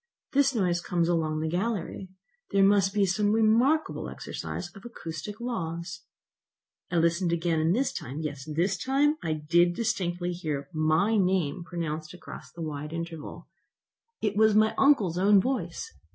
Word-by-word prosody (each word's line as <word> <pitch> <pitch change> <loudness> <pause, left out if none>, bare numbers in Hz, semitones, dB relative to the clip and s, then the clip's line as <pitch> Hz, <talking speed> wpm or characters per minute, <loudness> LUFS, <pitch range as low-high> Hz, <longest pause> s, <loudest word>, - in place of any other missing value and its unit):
This 275 -1 +3
noise 180 -5 +1
comes 175 -2 0
along 160 -2 0
the 160 - -1
gallery. 190 +1 -2 0.4
There 195 -1 +3
must 195 -1 +4
be 205 0 0
here 195 - +4
some 205 +3 +1
remarkable 235 +8 +2
exercise 175 0 -6
of 200 - -12
acoustic 205 -2 -7
laws!" 175 -7 -4 0.8
I - - -3
listened 170 +1 +2
again, 170 -1 +1
and 160 +4 +2
this 270 +4 0
time, 135 +5 -6
yes 145 -2 -5
this 180 +5 0
time, 290 +3 +2
I 160 - -1
did 170 +3 +2
distinctly 180 -6 -1
hear 150 -5 -4
my 160 +8 +2
name 185 -3 +1
pronounced 165 -2 -5
across - - -11
the 170 - -7
wide 150 0 -5
interval. 165 -2 -6 0.8
It 210 -2 0
was 215 0 +4
my 215 0 +4
uncle's 215 - +3
own 200 +1 +6
voice! 190 -7 -2
175 Hz, 155 wpm, -28 LUFS, 165-210 Hz, 0.8 s, own